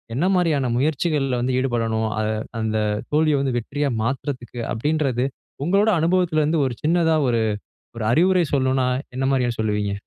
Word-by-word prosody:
என்ன 145 +8 +1
மாதிரியான 155 -8 +1
முயற்சிகள்ல 140 -2 0
வந்து 125 +1 0
ஈடுபடணும்? 115 -4 0
அத 110 - 0 0.3
அந்த 110 0 -1 0.3
தோல்விய 150 -1 +3
வந்து 135 -3 -1
வெற்றியா 145 +5 -2
மாத்துறதுக்கு, 125 -1 -4
அப்படின்றது 135 -1 0 0.4
உங்களோட 200 +5 +3
அனுபவத்துல 170 -1 +2
இருந்து 155 +2 +1
ஒரு 130 - -1
சின்னதா 165 0 +3
ஒரு 115 -1 +1 0.5
ஒரு 115 - -4
அறிவுரை 180 +5 +3
சொல்லணுனா 130 -1 +2 0.3
என்ன 130 - -2
மாரியா 125 -3 +1
சொல்லுவீங்க? 105 -2 0
135 Hz, 145 wpm, -22 LUFS, 120-155 Hz, 0.5 s, தோல்விய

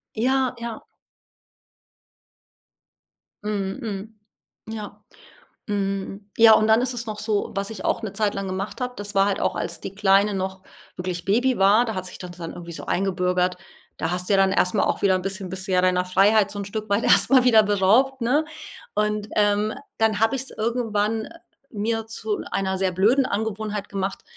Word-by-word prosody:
Ja, 255 +2 +1
ja. 235 -1 -6 2.6
Mhm, 200 -1 -2
mhm. 215 0 -6 0.5
Ja. 210 -2 -8 0.7
Hm, 195 0 -3
ja, 225 -1 +8
und 215 0 +3
dann 220 +2 +5
ist 255 0 -1
es 235 -1 -4
noch 215 -1 -5
so 210 -1 -1
was 200 +2 -1
ich 220 - -8
auch - - 0
’ne 205 -3 -4
Zeit 205 0 0
lang 195 0 -3
gemacht 190 +6 -4
habe, 250 0 -3
das 205 0 -4
war 195 - +5
halt 200 - -1
auch, - - 0
als - - -3
die 195 - -7
Kleine 200 0 +4
noch 190 0 -4 0.3
wirklich 180 -1 -4
Baby 245 +6 +2
war, 200 +5 +5
da 220 -3 -4
hat 185 0 -3
sich - - -9
dann 180 -2 -8
dann 165 -1 -6
irgendwie 170 -1 -9
so - - -6
eingebürgert 180 -1 0 0.4
da 165 - -1
hast 180 0 -2
du 200 - +3
ja - - +5
dann 195 0 +3
erst 180 +2 +2
mal 200 - +3
auch - - -1
wieder 195 -2 +4
'n 185 - -4
bisschen 195 0 -4
bist 190 +1 -5
ja 185 -1 +2
deiner 180 0 +2
Freiheit 200 +3 +3
so 205 - -6
’n - - -4
Stück 215 +1 -5
weit 200 +3 +2
erst - - +5
mal 260 -2 +6
wieder 225 -3 +6
beraubt, 215 +7 +3
ne? 275 +7 +2 0.5
Und, 210 0 -1
ähm, 210 +1 +2 0.3
dann 220 -2 +2
habe 225 +4 +3
ich’s 265 +1 -2
irgendwann, 220 -1 -1
äh, 335 - -13 0.3
mir 225 +1 -2
zu 220 -1 -3
einer 190 -1 -1
sehr 190 -1 0
blöden 220 +9 +3
Angewohnheit 215 -1 -3
gemacht, 195 -1 -3
205 Hz, 190 wpm, -23 LUFS, 195-220 Hz, 2.6 s, ja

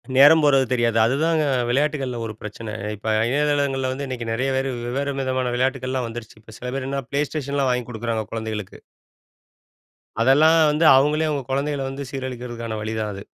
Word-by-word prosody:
நேரம் 145 +4 +8
போறது 135 -2 +4
தெரியாது. 120 -2 +1
அதுதாங்க 155 +6 +1 0.3
விளையாட்டுகள்ல 135 -2 0
ஒரு 110 - -5
பிரச்சனை. 110 +1 -7 0.2
இப்ப 110 +2 -3 0.2
இணையதளங்கள்ல 140 -1 +1
வந்து 140 +2 -4
இன்னைக்கு 125 -3 -5
நிறைய 130 +4 0
பேரு 135 +1 0 0.2
வெவ்வேறு 140 +3 -2
விதமான 130 -1 -1
விளையாட்டுகள் 130 0 -1
எல்லாம் 130 -2 -1
வந்துருச்சு. 115 -1 -9 0.2
சில 125 0 -5
பேர் 135 -1 -3 0.2
Play 140 +1 +1
Station 140 -2 -2
வாங்கி 125 -1 0
கொடுக்குறாங்க 115 -1 -2
குழந்தைகளுக்கு. 110 -3 -5 1.4
அதெல்லாம் 145 +7 +5 0.2
வந்து 155 +2 +1
அவங்களே 150 +4 +3
அவங்க 145 -3 -2
குழந்தைகள 140 +1 -1
வந்து 135 0 -6
சீரழிக்கிறதுக்கான 120 -4 -5
வழிதான் 110 0 -3
அது. 100 +1 -8
130 Hz, 155 wpm, -22 LUFS, 115-140 Hz, 1.4 s, நேரம்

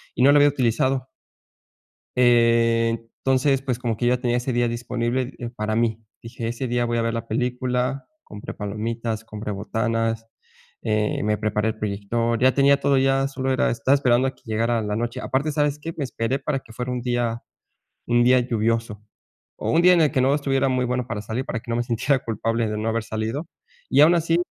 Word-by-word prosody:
y 125 - +1
no 140 - +7
lo 145 - +6
había 145 0 +6
utilizado. 130 0 0 1.1
Entonces, 115 +2 +2
pues, 125 -3 -2
como 120 -3 -2
que 120 - -1
ya 125 0 +3
tenía 120 -1 +1
ese 125 +2 -2
día 120 0 +1
disponible 120 +2 -2 0.2
para 110 0 -1
mí, 115 -1 0 0.2
dije 115 0 -5
ese 120 +2 -3
día 120 0 0
voy 120 0 -1
a - - +1
ver 115 0 -1
la 115 0 -4
película. 125 +3 -1 0.2
Compré 105 - -8
palomitas, 110 +2 -4
compré 105 0 -6
botanas, 115 +2 -2 0.6
eh, 105 -1 0
me 105 0 0
preparé 105 +1 0
el 110 - -4
proyector. 110 +3 -1
Ya 130 +1 +5
tenía 140 0 +4
todo 140 -1 +2
ya 135 0 +2
solo 135 -1 -3
era 130 - +2
estaba 120 +4 +2
esperando 130 -2 +3
a - - -6
que - - -28
llegara 115 +1 0
la 105 0 -2
noche. 120 +1 -3
Aparte, 140 +4 0
¿sabes 145 0 0
qué? 165 +2 -6
Me 145 - -2
esperé 125 +1 -2
para 140 0 -2
que 115 - -16
fuera 125 +1 -4
un 125 - -2
día 120 -1 -1 0.6
un 120 0 +3
día 125 +1 +5
lluvioso 115 -2 -1 0.5
o - - -3
un 165 - +4
día 180 +1 +7
en 170 - +4
el 155 - +3
que 130 - +1
no 135 +3 +3
estuviera 135 -2 +1
muy 130 -1 +1
bueno 125 0 -2
para 105 -4 -4
salir 110 +5 -3
para 115 - -3
que 120 - -7
no - - 0
me 120 - +1
sintiera 125 +3 +1
culpable 115 +1 -1
de 105 - -3
no 110 +1 -3
haber 115 0 -1
salido. 110 +8 -4 0.4
Y - - +5
aun 160 +3 +7
así, 165 0 +1
120 Hz, 205 wpm, -23 LUFS, 115-130 Hz, 1.1 s, no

